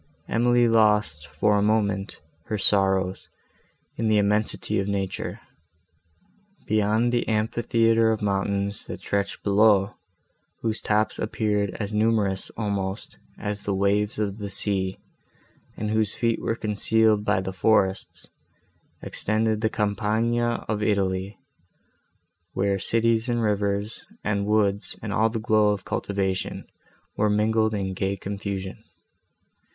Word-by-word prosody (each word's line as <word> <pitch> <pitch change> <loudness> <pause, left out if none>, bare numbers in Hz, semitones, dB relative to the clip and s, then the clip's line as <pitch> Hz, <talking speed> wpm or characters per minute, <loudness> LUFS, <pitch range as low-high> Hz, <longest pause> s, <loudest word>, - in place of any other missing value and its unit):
Emily 120 +1 +3
lost, 105 -10 +2
for 80 +8 +1
a 100 - +2
moment, 100 -2 0 0.2
her 110 - -2
sorrows, 95 -2 +2 0.7
in 115 - 0
the 110 -1 +3
immensity 105 +1 +1
of 100 - -2
nature. 100 -2 -3 1.3
Beyond 110 +3 +2
the 120 -1 0
amphitheatre 115 +1 +2
of 110 -1 -2
mountains, 100 0 -1
that - - -6
stretched 100 0 -2
below, 100 -1 +4 0.7
whose 110 -1 -1
tops 105 0 0
appeared 105 -2 -1
as 105 -1 -3
numerous 105 -3 +1
almost, 100 -2 -3 0.2
as 105 0 -4
the 100 - -2
waves 100 +2 +1
of 105 0 -2
the 100 -1 -5
sea, 95 -1 -1 0.8
and 105 0 -2
whose 110 -1 0
feet 115 -1 0
were 115 - -1
concealed 110 0 +2
by 95 - +1
the 95 0 -4
forests—extended 110 +2 -2
the 110 - +2
campagna 110 +3 0
of 105 -1 -2
Italy, 100 -1 0 1.2
where 100 0 0
cities 115 +3 +1
and 120 -1 0
rivers, 100 0 -1 0.2
and 100 -1 -1
woods 105 -1 +1
and 105 -2 -3
all 110 +2 +3
the 115 - -3
glow 110 -1 +3
of 105 -2 -2
cultivation 95 -2 -2 0.5
were 105 0 +2
mingled 110 +1 +2
in 95 -2 -2
gay 95 +1 -2
confusion. 100 -1 -5
105 Hz, 125 wpm, -25 LUFS, 100-110 Hz, 1.3 s, below